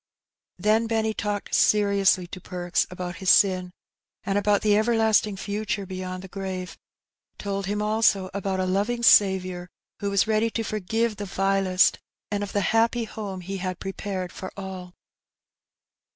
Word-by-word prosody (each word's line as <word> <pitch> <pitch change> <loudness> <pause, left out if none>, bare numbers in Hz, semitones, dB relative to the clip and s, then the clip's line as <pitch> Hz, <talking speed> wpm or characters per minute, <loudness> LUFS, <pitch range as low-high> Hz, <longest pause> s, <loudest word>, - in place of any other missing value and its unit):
287 215 +1 +4
Then 230 - -3
Benny 220 -1 0
talked 205 -1 -3
seriously 200 -3 +3
to 180 +1 -9
Perks 175 0 -1
about 180 -1 -6
his 190 -2 -1
sin, 185 -2 +4 0.5
and 195 - -1
about 205 0 +2
the 210 -1 +4
everlasting 220 -2 +2
future 205 0 -3
beyond 185 0 -6
the - - -8
grave; 190 -1 -5 0.6
told 200 -1 -3
him 210 +1 -1
also 210 -3 +2
about 195 -1 -2
a 185 - +1
loving 205 +6 -1
Saviour, 185 -4 +4 0.3
who 200 - -2
was 200 -1 +2
ready 220 +1 +1
to 225 0 -3
forgive 215 +2 -1
the 205 - -4
vilest, 195 -1 +2 0.3
and 205 0 -1
of 205 - -4
the 205 - 0
happy 230 +1 +2
home 205 -4 -6
He 195 +2 -5
had 185 -1 -4
prepared 195 -2 -4
for 190 - -7
all. 185 -2 -7
200 Hz, 155 wpm, -25 LUFS, 185-210 Hz, 0.6 s, 287